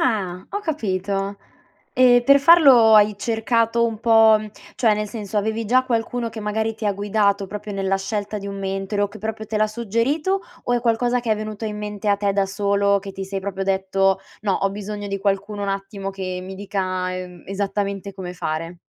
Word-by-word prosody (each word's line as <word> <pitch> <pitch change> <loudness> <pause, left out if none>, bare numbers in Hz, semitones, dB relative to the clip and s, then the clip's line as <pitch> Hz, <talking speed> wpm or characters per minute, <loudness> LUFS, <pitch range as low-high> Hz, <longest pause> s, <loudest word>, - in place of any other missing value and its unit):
Ah, 190 -6 -1
ho 405 - -3
capito. 200 - -2 0.6
E 245 -1 +6
per 280 +2 +7
farlo 275 -8 +7
hai 210 0 +6
cercato 230 +1 +1
un 220 -1 -5
po' 225 -1 +6
mhmm, 215 0 -8 0.3
cioè 225 -4 +3
nel 210 0 -3
senso, 210 -2 -6
avevi 220 +2 0
già 255 +4 +3
qualcuno 235 0 -1
che 220 -1 -7
magari 220 +1 -1
ti 215 -1 -4
ha 205 - +2
guidato 200 0 +1
proprio 210 +1 -7
nella 195 0 0
scelta 205 +1 -3
di 200 - -7
un 200 0 -5
mentore 195 +1 -2
o 205 - +1
che 215 - -12
proprio 220 +1 -4
te 215 0 -2
l' - - -2
ha - - +4
suggerito, 235 - 0 0.2
o 245 - 0
è 240 - +2
qualcosa 240 +1 +1
che 235 -2 -3
è 215 - 0
venuto 215 0 -5
in 210 -1 -4
mente 210 0 -4
a 200 - +4
te 200 0 0
da 195 0 +1
solo 200 0 +1
che 195 0 -8
ti 195 0 -5
sei 195 0 -4
proprio 195 0 -4
detto: 195 0 +1 0.2
"No, 205 -2 +1
ho 195 - 0
bisogno 205 +1 -6
di 200 0 -2
qualcuno 200 +1 -1
un 200 - -2
attimo 195 0 -4
che 185 -1 -5
mi 190 +1 -7
dica, 200 0 -3 0.3
uhm, 180 -1 -7
esattamente 200 0 -3
come 180 -2 -6
fare"? 165 0 -4
205 Hz, 210 wpm, -22 LUFS, 195-225 Hz, 0.6 s, per